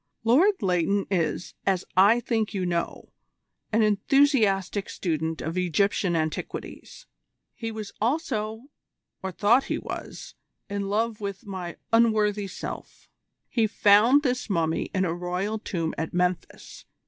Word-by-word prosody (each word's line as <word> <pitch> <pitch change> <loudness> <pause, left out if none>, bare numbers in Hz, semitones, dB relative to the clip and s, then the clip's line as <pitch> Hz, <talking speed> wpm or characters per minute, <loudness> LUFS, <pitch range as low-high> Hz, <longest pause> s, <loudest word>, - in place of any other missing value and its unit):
"Lord 305 - +4
Leighton 190 +2 +1
is, 170 -2 -1
as 190 -2 0
I 200 +6 +6
think 225 -3 -1
you 185 -2 -1
know, 170 -1 -3 0.6
an 220 +1 +3
enthusiastic 210 - +2
student 160 -2 -2
of 165 +3 -2
Egyptian 180 0 +1
antiquities. 160 - -5 0.5
He 225 -1 -5
was 215 -2 -6
also, 225 -4 -1 0.6
or 190 - -4
thought 220 +8 +3
he - - -2
was, - - -7 0.3
in 200 -1 -3
love 220 +1 -1
with 200 +2 -5
my 185 -4 -6 0.2
unworthy 215 -3 +3
self. 190 - -8 0.4
He 225 -3 +1
found 215 +7 +5
this 250 -3 -1
mummy 165 -4 0
in 190 -1 +1
a 165 - -1
royal 180 +5 -2
tomb 165 -6 -3
at 160 +2 -4
Memphis. 180 0 -2
200 Hz, 130 wpm, -26 LUFS, 180-225 Hz, 0.6 s, I